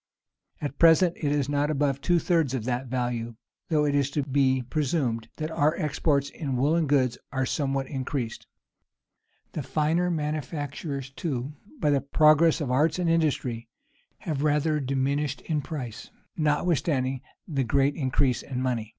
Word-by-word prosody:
[] -, -, -43 dB
At 145 Hz, -1 st, -4 dB
present, 170 Hz, +1 st, +6 dB
it 145 Hz, -3 st, -1 dB
is 145 Hz, -2 st, +1 dB
not 145 Hz, +1 st, 0 dB
above 140 Hz, -2 st, 0 dB
two 175 Hz, +4 st, +3 dB
thirds 165 Hz, -6 st, +1 dB
of 120 Hz, -, -3 dB
that 125 Hz, +1 st, -2 dB
value; 120 Hz, -2 st, -2 dB, 0.3 s
though 150 Hz, -3 st, +2 dB
it 145 Hz, -, +1 dB
is 140 Hz, -1 st, 0 dB
lo 145 Hz, -, +2 dB
be 130 Hz, -2 st, +2 dB
presumed 130 Hz, -4 st, -1 dB
that 155 Hz, 0 st, -3 dB
our 155 Hz, 0 st, +2 dB
exports 145 Hz, -2 st, 0 dB
in 140 Hz, -6 st, -3 dB
woollen 155 Hz, +5 st, +2 dB
goods 130 Hz, -4 st, +2 dB
are 130 Hz, -1 st, 0 dB
somewhat 135 Hz, -1 st, -1 dB
increased. 130 Hz, -3 st, -4 dB, 1.0 s
The -, -, -4 dB
finer 165 Hz, +4 st, +1 dB
manufactures, 145 Hz, -3 st, -3 dB
too, 135 Hz, -2 st, -3 dB, 0.3 s
by 150 Hz, -, +2 dB
the 140 Hz, -1 st, +2 dB
progress 155 Hz, +3 st, +4 dB
of 135 Hz, -4 st, -2 dB
arts 150 Hz, +5 st, +2 dB
and 175 Hz, -2 st, +1 dB
industry, 130 Hz, -8 st, 0 dB, 0.5 s
have 150 Hz, -4 st, -2 dB
rather 150 Hz, +1 st, +2 dB
diminished 140 Hz, +1 st, -1 dB
in 155 Hz, -3 st, -1 dB
price, 125 Hz, -7 st, -6 dB, 0.3 s
notwithstanding 150 Hz, -4 st, +1 dB, 0.3 s
the 140 Hz, -6 st, 0 dB
great 135 Hz, +4 st, +2 dB
increase 130 Hz, -3 st, +1 dB
of 130 Hz, -, -6 dB
money. 125 Hz, -4 st, -1 dB
140 Hz, 155 wpm, -26 LUFS, 130-155 Hz, 1.0 s, present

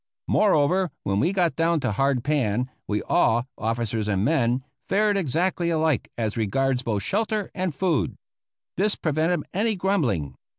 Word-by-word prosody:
Moreover, 185 Hz, -1 st, +3 dB
when 100 Hz, +1 st, 0 dB
we 165 Hz, -, +2 dB
got 180 Hz, -4 st, +1 dB
down 165 Hz, 0 st, +2 dB
to 130 Hz, -, 0 dB
hard 135 Hz, +3 st, +1 dB
pan, 125 Hz, -4 st, 0 dB, 0.2 s
we 105 Hz, 0 st, -1 dB
all, 120 Hz, +2 st, +2 dB
officers 115 Hz, -1 st, -2 dB
and 100 Hz, -1 st, +1 dB
men, 130 Hz, -3 st, +1 dB, 0.3 s
fared 210 Hz, +1 st, +2 dB
exactly 175 Hz, +1 st, 0 dB
alike 160 Hz, -4 st, +1 dB
as 110 Hz, -3 st, -1 dB
regards 125 Hz, +4 st, 0 dB
both 110 Hz, -6 st, -2 dB
shelter 215 Hz, -, -1 dB
and 185 Hz, -5 st, -2 dB
food. 170 Hz, -3 st, 0 dB, 0.6 s
This 205 Hz, +3 st, +2 dB
prevented 160 Hz, +3 st, 0 dB
any 215 Hz, +3 st, +1 dB
grumbling. 130 Hz, -, 0 dB
145 Hz, 145 wpm, -24 LUFS, 115-185 Hz, 0.6 s, Moreover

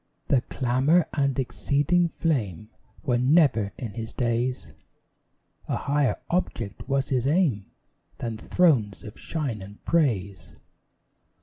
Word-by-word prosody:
The 130 Hz, -, +4 dB
clamour 135 Hz, +9 st, +2 dB
and 140 Hz, -2 st, +1 dB
exceeding 145 Hz, +6 st, +1 dB
flame 110 Hz, -, -2 dB, 0.3 s
Were 120 Hz, -2 st, +1 dB
never 130 Hz, -7 st, +3 dB
in 115 Hz, -5 st, -6 dB
his 115 Hz, +1 st, -6 dB
days: 120 Hz, +1 st, -1 dB, 0.9 s
A -, -, -1 dB
higher 140 Hz, -2 st, +1 dB, 0.2 s
object 120 Hz, -, -2 dB
was 135 Hz, 0 st, 0 dB
his 130 Hz, -1 st, +1 dB
aim 140 Hz, -, +2 dB, 0.5 s
Than 115 Hz, -4 st, -4 dB
thrones 115 Hz, -, +2 dB
of 105 Hz, -, -10 dB
shine 135 Hz, -10 st, -3 dB
and 100 Hz, +2 st, -12 dB
praise. 100 Hz, -, 0 dB
130 Hz, 115 wpm, -26 LUFS, 110-145 Hz, 0.9 s, The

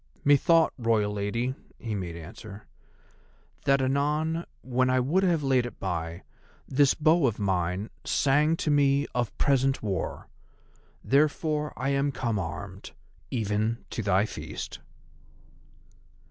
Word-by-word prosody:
"Methought, 160 Hz, +3 st, +5 dB
Royal 110 Hz, -3 st, +1 dB
Lady," 115 Hz, +5 st, -1 dB, 0.2 s
he 115 Hz, -2 st, -5 dB
made 90 Hz, -4 st, -4 dB
answer, 100 Hz, +5 st, -10 dB, 1.0 s
"that 140 Hz, -1 st, +3 dB
anon 150 Hz, +5 st, 0 dB, 0.2 s
when 130 Hz, 0 st, +1 dB
I 130 Hz, 0 st, +3 dB
would 150 Hz, +10 st, +2 dB
have 170 Hz, -5 st, +2 dB
laid 130 Hz, -3 st, +2 dB
it 120 Hz, -, -12 dB
by, 85 Hz, -2 st, -3 dB, 0.4 s
this 140 Hz, 0 st, +3 dB
bow 155 Hz, -1 st, +4 dB
of 115 Hz, -, -1 dB
mine 95 Hz, 0 st, -1 dB
sang 150 Hz, +4 st, +2 dB
to 155 Hz, -, 0 dB
me 140 Hz, 0 st, +3 dB
of 120 Hz, -2 st, -2 dB
present 135 Hz, -2 st, +2 dB
war. 100 Hz, -3 st, -3 dB, 0.8 s
Therefore 150 Hz, +1 st, +1 dB
I 135 Hz, -, -1 dB
am 140 Hz, +1 st, +1 dB
come 115 Hz, -4 st, -1 dB
armed—even 105 Hz, +4 st, -4 dB
to -, -, -3 dB
thy 100 Hz, 0 st, +2 dB
feast." -, -, -7 dB
125 Hz, 120 wpm, -27 LUFS, 105-145 Hz, 1.0 s, Methought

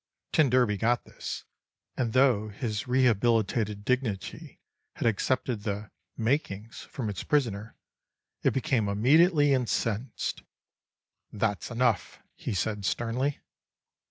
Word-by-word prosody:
T -, -, +4 dB
d 125 Hz, -7 st, +3 dB
got 120 Hz, +3 st, +1 dB
this; -, -, -6 dB, 0.5 s
and 115 Hz, -3 st, -1 dB
though 125 Hz, -5 st, +4 dB
his 105 Hz, +1 st, -3 dB
rehabilitated 115 Hz, -4 st, +2 dB
dignity 125 Hz, -7 st, -2 dB, 0.3 s
had -, -, -4 dB
accepted 115 Hz, +1 st, 0 dB
the 105 Hz, -1 st, -4 dB, 0.3 s
"makin's" 115 Hz, -3 st, -1 dB
from 125 Hz, -5 st, -5 dB
its 100 Hz, -3 st, -3 dB
prisoner, 115 Hz, -7 st, 0 dB, 0.7 s
it -, -, +4 dB
became 125 Hz, -5 st, 0 dB
immediately 145 Hz, -, +4 dB
incensed: 120 Hz, -2 st, -1 dB, 0.9 s
"That's 105 Hz, -1 st, -1 dB
enough," 120 Hz, -2 st, 0 dB, 0.2 s
he -, -, -4 dB
said 105 Hz, +2 st, -1 dB
sternly. 120 Hz, +8 st, -1 dB
115 Hz, 105 wpm, -28 LUFS, 105-130 Hz, 0.9 s, T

